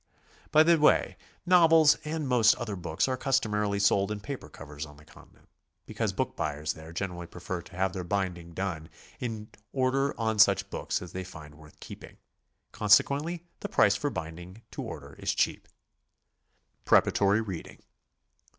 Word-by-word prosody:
By 155 - +6
the 170 +1 +5
w^ay, 150 - +3 0.3
novels 165 -4 +6
and 155 -1 -3
most 120 -4 +5
other 115 -4 -5
books 85 +1 -1
are 130 - 0
customarily 105 -6 0
sold 100 0 +2
in 105 - -3
paper 140 +5 -7
covers 75 0 -9
on 75 -2 -11
the 75 - -17
Continent, - - -19 0.4
because - - -2
book - - -3
buyers 75 +1 -2
there 80 +1 -11
generally 85 -1 -5
prefer 90 +1 -6
to 90 - -15
have 95 0 0
their 95 -2 -4
binding 85 -3 -3
done 85 -5 -4 0.3
to 110 -4 -5 0.2
order 135 +1 0
on 110 -1 -1
such 105 - +4
books - - -3
as 90 - -10
they 95 - -5
find 80 -5 -11
worth 75 0 -17
keeping. - - -11 0.5
Consequently 145 +11 +2 0.2
the - - -5
price - - +4
for - - -1
binding 85 +6 -8
to - - -6
order - - -8
is - - -1
cheap. - - 0 1.2
PREPARATORY 100 +2 +3
READING. 95 -6 -7
100 Hz, 160 wpm, -28 LUFS, 85-130 Hz, 1.2 s, By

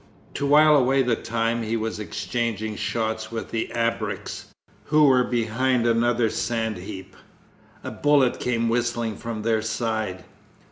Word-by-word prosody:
To 140 - -2
while 150 +1 +6
away 135 0 +3
the 120 -2 +1
time 115 +1 -1
he 115 +1 -1
was 110 -1 -3
exchanging 110 +1 -3
shots 110 0 -2
with 115 -1 -5
the 115 - -2
ABREKS, 115 -3 -2 0.4
who 155 0 +4
were 130 -3 +5
behind 120 +1 0
another 120 0 +2
sand 110 -2 -2
heap. 95 +1 -9 0.7
A - - -5
bullet 145 -4 +2
came 115 -2 0
whistling 120 -1 -1
from 115 -1 -6
their 110 -1 +1
side. 110 -4 -2
115 Hz, 140 wpm, -24 LUFS, 110-120 Hz, 0.7 s, while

